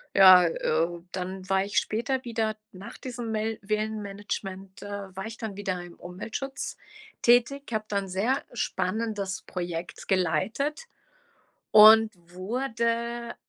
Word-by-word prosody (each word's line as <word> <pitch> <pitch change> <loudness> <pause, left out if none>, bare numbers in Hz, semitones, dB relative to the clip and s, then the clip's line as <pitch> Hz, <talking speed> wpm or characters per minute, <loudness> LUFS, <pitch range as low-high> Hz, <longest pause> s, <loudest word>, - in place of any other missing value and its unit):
Ja, 185 -2 +9
äh, 165 +1 0
dann 185 0 -5
war 195 0 +2
ich 205 0 +2
später 245 +4 -2
wieder 225 -2 -1 0.2
nach 190 +2 -10
diesem 240 -3 -5
Mill 220 0 -1
Villenmanagement, 200 -2 -4
äh, 200 -2 -7
war 195 +1 -5
ich 225 0 -7
dann 210 -3 -6
wieder 185 -3 -2
im 175 -1 -11
Umweltschutz 225 +9 -6 0.5
tätig, 245 +4 +4
habe 215 0 -1
da 200 - -1
'n 195 -1 -2
sehr 215 +9 0
spannendes 200 -1 -2
Projekt 175 -1 -6
geleitet 205 - 0 0.9
und 220 +1 +8
wurde 235 +6 -3
205 Hz, 125 wpm, -27 LUFS, 185-230 Hz, 0.9 s, Ja